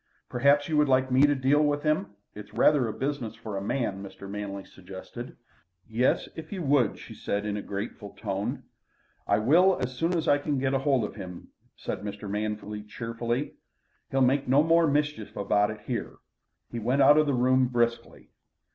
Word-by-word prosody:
"Perhaps 140 Hz, +3 st, +3 dB
you 155 Hz, -, 0 dB
would 150 Hz, -1 st, +3 dB
like 130 Hz, 0 st, +3 dB
me 135 Hz, +3 st, +6 dB
to 145 Hz, -, +2 dB
deal 140 Hz, +3 st, +3 dB
with 145 Hz, 0 st, 0 dB
him? 150 Hz, -10 st, 0 dB, 0.2 s
It's 105 Hz, 0 st, -11 dB
rather 145 Hz, -5 st, +4 dB
a -, -, -2 dB
business 130 Hz, -4 st, -3 dB
for 110 Hz, -2 st, -7 dB
a 95 Hz, -, -2 dB
man," 100 Hz, -2 st, -2 dB
Mr. 100 Hz, 0 st, -9 dB
Manley 100 Hz, -1 st, -5 dB
suggested. 95 Hz, +6 st, -10 dB, 0.5 s
"Yes, 115 Hz, +3 st, +1 dB
if 160 Hz, -1 st, -9 dB
you 190 Hz, -4 st, -4 dB
would," 135 Hz, -6 st, +2 dB
she -, -, -11 dB
said 100 Hz, +1 st, -3 dB
in 105 Hz, -1 st, -2 dB
a 105 Hz, -, -3 dB
grateful 100 Hz, +1 st, -6 dB
tone. 100 Hz, -2 st, -3 dB, 0.6 s
"I 100 Hz, -, +3 dB
will, 170 Hz, -, +4 dB
as 125 Hz, +1 st, -2 dB
soon 165 Hz, +6 st, 0 dB
as 160 Hz, 0 st, -2 dB
I 145 Hz, -, +4 dB
can 145 Hz, -1 st, -1 dB
get 135 Hz, 0 st, 0 dB
hold 135 Hz, -2 st, +2 dB
of 105 Hz, -, -5 dB
him," 90 Hz, -1 st, -9 dB, 0.3 s
said -, -, -5 dB
Mr. 105 Hz, 0 st, -6 dB
Manley 105 Hz, 0 st, -3 dB
cheerfully. 115 Hz, +5 st, -4 dB, 0.5 s
"He'll 135 Hz, -, +1 dB
make 135 Hz, +2 st, +3 dB
no 135 Hz, +4 st, +5 dB
more 165 Hz, 0 st, +4 dB
mischief 150 Hz, -6 st, -1 dB
about 105 Hz, +1 st, +1 dB
here," 120 Hz, +2 st, -4 dB, 0.6 s
He 120 Hz, -, -4 dB
went 125 Hz, +5 st, +2 dB
out 145 Hz, +3 st, +7 dB
of 155 Hz, -, +2 dB
the 140 Hz, -, +1 dB
room 130 Hz, +1 st, +3 dB
briskly. 120 Hz, -1 st, -2 dB
125 Hz, 185 wpm, -27 LUFS, 105-145 Hz, 0.6 s, out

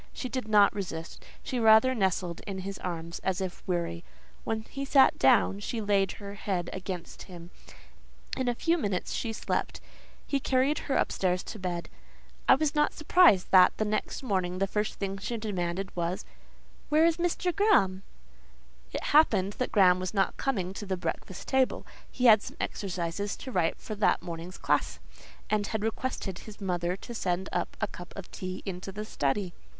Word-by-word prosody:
She 255 Hz, -, -5 dB
did 250 Hz, -1 st, -3 dB
not 205 Hz, -2 st, +5 dB
resist: 170 Hz, -5 st, -6 dB, 0.2 s
she 255 Hz, -, -2 dB
rather 225 Hz, +3 st, +6 dB
nestled 185 Hz, -5 st, -1 dB
in 195 Hz, -2 st, -4 dB
his 195 Hz, +1 st, -6 dB
arms, 170 Hz, -1 st, -5 dB
as 190 Hz, -2 st, -1 dB
if 185 Hz, -2 st, -4 dB
weary. 170 Hz, -1 st, -2 dB, 0.4 s
When 220 Hz, -1 st, -2 dB
he 275 Hz, +4 st, -6 dB
sat 275 Hz, -1 st, +5 dB
down, 230 Hz, -6 st, +4 dB
she 225 Hz, +3 st, -3 dB
laid 200 Hz, -3 st, +1 dB
her 200 Hz, -1 st, -8 dB
head 190 Hz, -4 st, -3 dB
against 185 Hz, -2 st, -6 dB
him; 175 Hz, -1 st, -10 dB, 0.8 s
in 260 Hz, -1 st, -2 dB
a 245 Hz, -, +1 dB
few 335 Hz, +7 st, +1 dB
minutes 200 Hz, -9 st, -2 dB
she 230 Hz, -, -2 dB
slept; 220 Hz, -, -2 dB, 0.5 s
he 280 Hz, -, 0 dB
carried 265 Hz, +3 st, +1 dB
her 270 Hz, -, +2 dB
upstairs 180 Hz, -1 st, +1 dB
to 215 Hz, -, -8 dB
bed. 175 Hz, -2 st, -3 dB, 0.6 s
I -, -, +9 dB
was 310 Hz, -1 st, 0 dB
not 295 Hz, -1 st, +2 dB
surprised 310 Hz, -, +4 dB
that, 185 Hz, -1 st, +7 dB
the 215 Hz, -, 0 dB
next 215 Hz, +5 st, -2 dB
morning, 185 Hz, -6 st, -1 dB
the 195 Hz, -, +2 dB
first 210 Hz, +2 st, -2 dB
thing 195 Hz, -1 st, -4 dB
she 210 Hz, +4 st, -3 dB
demanded 190 Hz, -3 st, -3 dB
was, 175 Hz, +3 st, -2 dB, 0.6 s
"Where 310 Hz, +2 st, +5 dB
is 335 Hz, -1 st, +3 dB
Mr. 350 Hz, 0 st, 0 dB
Graham?" 200 Hz, -, +3 dB, 0.9 s
It -, -, -4 dB
happened 205 Hz, -10 st, +4 dB
that 255 Hz, -, -1 dB
Graham 185 Hz, -3 st, +5 dB
was 185 Hz, +3 st, -4 dB
not 195 Hz, -1 st, +2 dB
coming 190 Hz, -9 st, -1 dB
to 205 Hz, -, -6 dB
the 190 Hz, -1 st, -1 dB
breakfast 185 Hz, +1 st, -5 dB
table; 265 Hz, -1 st, +1 dB, 0.2 s
he 250 Hz, -, -2 dB
had 220 Hz, -3 st, +8 dB
some -, -, -9 dB
exercises 185 Hz, +1 st, -3 dB
to 260 Hz, -, -7 dB
write 175 Hz, -7 st, +1 dB
for 215 Hz, -, -7 dB
that 210 Hz, 0 st, +2 dB
morning's 170 Hz, +1 st, -7 dB
class, -, -, 0 dB, 0.5 s
and 210 Hz, -1 st, 0 dB
had 220 Hz, -1 st, -2 dB
requested 220 Hz, -4 st, -3 dB
his 215 Hz, -2 st, -11 dB
mother 180 Hz, -2 st, -1 dB
to 240 Hz, -, -9 dB
send 185 Hz, -3 st, -2 dB
a -, -, 0 dB, 0.2 s
cup 175 Hz, 0 st, -10 dB
of 195 Hz, -2 st, -9 dB
tea 185 Hz, 0 st, -6 dB
into 190 Hz, 0 st, -5 dB
the 210 Hz, +2 st, -6 dB
study. 175 Hz, +2 st, -1 dB
195 Hz, 175 wpm, -29 LUFS, 180-230 Hz, 0.9 s, I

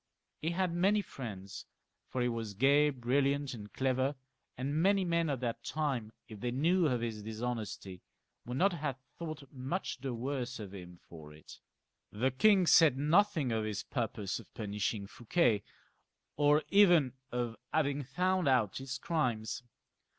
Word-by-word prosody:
He 160 Hz, -, 0 dB
had 180 Hz, 0 st, 0 dB
many 200 Hz, +4 st, +3 dB, 0.2 s
Mends, 100 Hz, -6 st, -7 dB, 0.4 s
for 125 Hz, -, -1 dB
he -, -, +2 dB
was 115 Hz, -3 st, -3 dB
gay, 140 Hz, +6 st, +5 dB
brilliant, 140 Hz, +2 st, 0 dB
and 105 Hz, -3 st, -9 dB
clever, 130 Hz, +1 st, 0 dB, 0.4 s
and 140 Hz, +5 st, -1 dB
many 195 Hz, +1 st, +3 dB
men 170 Hz, -2 st, +1 dB
of 135 Hz, -3 st, -2 dB
that 120 Hz, -2 st, -3 dB
time, 135 Hz, -8 st, -2 dB, 0.2 s
if 110 Hz, -2 st, -10 dB
they 120 Hz, -, -2 dB
knew 165 Hz, +7 st, +2 dB
of 125 Hz, -4 st, 0 dB
his 115 Hz, -2 st, -3 dB
dishonesty, 110 Hz, -4 st, -5 dB, 0.4 s
would 125 Hz, +2 st, -5 dB
not 195 Hz, +5 st, +3 dB
have 150 Hz, -5 st, -3 dB, 0.2 s
thought 155 Hz, -3 st, -5 dB
much 135 Hz, +5 st, -3 dB
the 130 Hz, -2 st, -3 dB
worse 130 Hz, +1 st, -3 dB
of 100 Hz, -3 st, -7 dB
him 90 Hz, -2 st, -10 dB
for 80 Hz, -3 st, -11 dB
it. 75 Hz, -, -14 dB, 0.5 s
The 125 Hz, +6 st, 0 dB
king 190 Hz, +8 st, +5 dB
said 160 Hz, -5 st, +6 dB
nothing 155 Hz, -, +3 dB
of 110 Hz, -1 st, 0 dB
his 110 Hz, -1 st, -3 dB
purpose 110 Hz, -6 st, -3 dB
of -, -, -15 dB
punishing 105 Hz, -1 st, -2 dB
Fouquet, 115 Hz, -, +1 dB, 0.7 s
or 150 Hz, +1 st, +4 dB
even 175 Hz, -10 st, +5 dB, 0.2 s
of 120 Hz, -2 st, -2 dB, 0.2 s
having 145 Hz, -2 st, +1 dB
found 180 Hz, +6 st, 0 dB
out 125 Hz, -7 st, +2 dB
his 135 Hz, -1 st, -4 dB
crimes. 125 Hz, -8 st, -1 dB
130 Hz, 155 wpm, -33 LUFS, 115-155 Hz, 0.7 s, said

